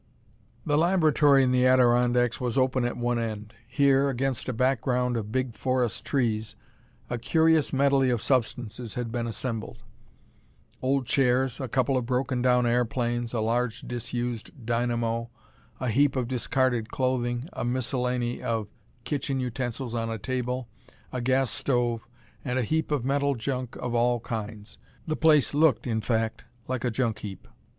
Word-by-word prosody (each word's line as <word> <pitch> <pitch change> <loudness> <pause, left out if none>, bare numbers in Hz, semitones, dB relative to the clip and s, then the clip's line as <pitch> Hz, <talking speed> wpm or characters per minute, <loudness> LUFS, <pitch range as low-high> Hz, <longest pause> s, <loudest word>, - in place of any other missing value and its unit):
The 145 0 +2
laboratory 155 -5 +4
in 130 - +2
the 125 0 +4
Adirondacks 125 -1 +3
was 125 +1 -1
open 130 -1 +2
at 120 - -2
one 120 0 0
end. 110 -2 -4
Here, 140 -1 +3
against 135 -1 -1
a - - +1
background 125 0 +1
of 110 -2 -3
big 130 -1 -1
forest 125 -5 -1
trees, 110 -5 -1 0.5
a 120 - -3
curious 160 +3 +3
medley 135 -1 +3
of 120 -2 +1
substances 120 -2 -1
had 120 -2 -3
been 115 0 -2
assembled: 115 -1 -5 1.0
old 135 0 +1
chairs, 130 0 +2
a 130 - -3
couple 130 +2 +1
of 120 -2 -2
broken 125 0 0
down 125 -1 +3
airplanes, 120 0 0
a 115 - -1
large 115 +1 0
disused 120 +2 -5
dynamo, 115 0 -1 0.5
a 125 - -1
heap 140 +4 +3
of 125 -2 -1
discarded 125 -1 0
clothing, 125 0 -1
a - - -4
miscellany 125 0 -1
of 110 -3 -2 0.3
kitchen 135 -1 -2
utensils 125 -1 -3
on 115 -1 -1
a 115 - -3
table, 125 +2 -3 0.5
a 125 - -2
gas 130 -1 +2
stove, 120 -4 0 0.4
and 125 -2 -2
a 130 - +1
heap 160 +7 0
of 145 -5 -1
metal 140 +1 +1
junk 125 +1 -3
of 125 -1 -4
all 120 0 +2
kinds. 110 -2 -6 0.3
The 155 - -1
place 155 -4 +4
looked, 150 -4 +3
in 110 -3 -1
fact, 110 -1 -1 0.2
like 130 -2 -2
a 125 - +1
junk 115 -2 -1
heap. 100 -3 -8
125 Hz, 155 wpm, -27 LUFS, 115-130 Hz, 1.0 s, laboratory